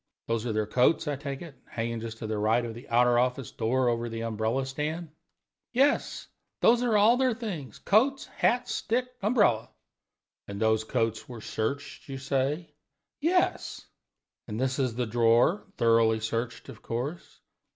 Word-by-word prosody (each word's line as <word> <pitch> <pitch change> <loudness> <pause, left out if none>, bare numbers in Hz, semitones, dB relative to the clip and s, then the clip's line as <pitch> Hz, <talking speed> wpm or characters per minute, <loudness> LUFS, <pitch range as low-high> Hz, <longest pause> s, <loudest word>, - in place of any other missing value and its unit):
Those 115 +1 -1
are - - 0
their 110 0 0
coats, 125 +9 +2
I 145 - 0
take 140 +2 -6
it, 165 -4 -10 0.2
hanging 115 0 -3
just 110 0 -6
to 115 - -6
the 110 -1 -2
right 110 +3 +2
of 115 - -5
the 120 +4 -12
outer 120 0 +4
office 125 0 -1
door, 125 +3 +1
over 120 0 0
the 115 0 -5
umbrella 115 +4 -1
stand?" 150 +4 -4 0.6
"Yes, 275 +4 +1 0.3
those 235 +1 +5
are 235 -4 +3
all 220 +4 +5
their 255 -2 +2
things 175 - -6
coats, 265 +7 +2
hats, 245 +1 0
stick, 245 +3 0 0.2
and 200 - 0
umbrella." 160 - +3 0.8
"And 100 0 -6
those 110 0 +2
coats 115 +1 -1
were 120 -2 -7
searched, 140 +7 -4
you 135 - -4
say?" 135 +4 -1 0.5
"Yes." 350 +4 0 0.6
"And 110 0 -4
this 130 +1 0
is 130 -4 0
the 125 0 0
drawer 120 - +3
thoroughly 115 -1 +4
searched, 115 +2 -3
of - - -11
course?" 135 +9 -5
125 Hz, 165 wpm, -28 LUFS, 115-165 Hz, 0.8 s, those